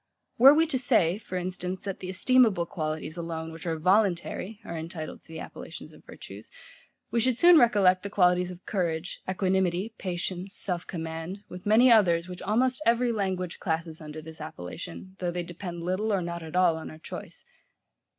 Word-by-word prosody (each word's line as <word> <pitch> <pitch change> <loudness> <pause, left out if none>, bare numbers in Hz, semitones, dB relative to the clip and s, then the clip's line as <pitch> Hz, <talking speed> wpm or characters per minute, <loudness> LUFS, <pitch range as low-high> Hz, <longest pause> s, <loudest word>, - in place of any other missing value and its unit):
Were 265 +3 +10
we 325 +1 +4
to 275 -5 0
say, 205 -8 +3
for 185 -4 -5
instance, 180 0 -4
that 195 -2 -4
the 185 - -6
esteemable 215 -2 +3
qualities 155 -1 -4
alone, 165 -1 -4
which 165 +1 -8
are 165 -1 -1
voluntary, 195 +3 +1
are 170 - -5
entitled 160 0 -6
to - - -28
the 160 0 -8
appellations - - -9
of - - -17
virtues; - - -11 0.6
we 235 - +2
should 245 +1 +2
soon 345 +3 +8
recollect 200 -6 +4
the 200 - -5
qualities 180 -2 +3
of 180 0 -10
courage, 175 -3 -2
equanimity, 190 +2 0
patience, 185 +1 -4
self 175 -3 -3
command; 165 +3 -5
with 180 +2 -8
many 235 +4 +6
others, 175 -6 +4
which 180 -1 -8
almost 250 +6 +1
every 235 0 +3
language 190 -5 -2
classes 160 -1 -3
under 155 0 -8
this 160 0 -10
appellation, 170 - -8
though 180 - -1
they 175 0 -3
depend 175 0 -7
little 185 +5 -1
or 195 -3 +1
not 170 0 -4
at 160 +1 -8
all 180 -3 +4
on 160 - -7
our 155 - -10
choice. - - -9
180 Hz, 180 wpm, -27 LUFS, 170-205 Hz, 0.6 s, Were